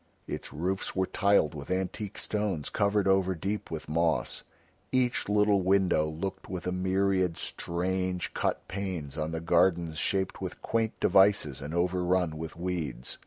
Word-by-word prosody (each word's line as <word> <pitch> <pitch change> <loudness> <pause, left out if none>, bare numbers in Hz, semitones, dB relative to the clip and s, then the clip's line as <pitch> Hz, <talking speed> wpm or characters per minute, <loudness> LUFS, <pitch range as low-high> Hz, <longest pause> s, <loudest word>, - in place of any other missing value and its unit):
Its - - -5
roofs 95 +6 -2
were 95 0 +2
tiled 100 -6 +2
with 70 -2 -8
antique 95 +2 -2
stones 105 -8 -2
covered 100 -1 +2
over 95 -1 +3
deep 100 +6 -3
with 80 -1 -5
moss, 80 +1 +1 0.5
each 125 -4 +1
little 105 -1 +4
window 95 -4 +3
looked 95 +5 -5
with 90 -2 -5
a 90 - 0
myriad 95 -1 +1
strange 90 +1 -2
cut - - -1
panes 90 -8 -4
on 80 0 -2
the 80 - -2
gardens 85 -1 +2
shaped 95 -1 0
with - - -5
quaint 115 -1 -1
devices 95 -9 +4
and 75 +4 -5
overrun 90 -1 +1
with 80 +1 -6
weeds. 80 -8 -3
90 Hz, 150 wpm, -29 LUFS, 80-95 Hz, 0.5 s, little